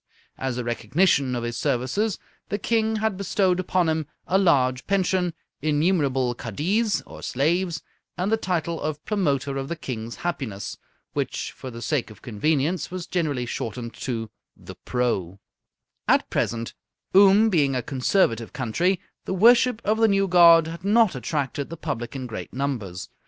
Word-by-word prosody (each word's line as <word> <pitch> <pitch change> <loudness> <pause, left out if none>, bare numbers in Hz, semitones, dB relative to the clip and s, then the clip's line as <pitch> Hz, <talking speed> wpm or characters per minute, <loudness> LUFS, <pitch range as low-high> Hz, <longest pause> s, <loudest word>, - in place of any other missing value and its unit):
As 130 -2 -2
a 125 - -2
recognition 130 - +1
of 120 - -3
his 120 0 -3
services, 140 - 0 0.3
the 205 - -1
King 220 +1 +1
had 220 -2 -1
bestowed 190 -2 +1
upon 185 -1 +1
him 160 -2 0 0.2
a 190 - +2
large 130 -8 +2
pension, 185 -3 +1 0.3
innumerable 145 -5 +1
kaddiz 185 - -1
or - - -11
slaves, 165 +5 0 0.3
and 185 +4 -1
the - - +5
title 170 -5 -2
of 150 0 -4
Promoter 145 -9 0
of 135 0 -3
the 170 - -3
King's 115 -6 -6
Happiness, 115 - -4 0.3
which - - -2
for 130 - -9
the 115 -1 -8
sake 150 -8 -1
of 105 -2 -15
convenience 150 - 0
was 180 -1 -5
generally 155 -9 -1
shortened 115 0 -5
to 115 -4 -4 0.3
The - - -10
Pro. 100 -7 -2 0.7
At - - +3
present, 115 0 -1 0.4
Oom 200 +3 +7
being 145 -6 +2
a 125 - -1
conservative 125 - +1
country, 155 - 0 0.3
the 190 - -2
worship 235 +3 +5
of 215 +2 +2
the 225 - +5
new 195 -1 +2
god 170 -3 +7
had 165 +2 -7
not 215 -1 +4
attracted 140 +1 -3
the 165 - -7
public 130 -6 -4
in 130 -1 -4
great 115 -3 -6
numbers. 120 -10 -3
155 Hz, 155 wpm, -24 LUFS, 125-185 Hz, 0.7 s, Oom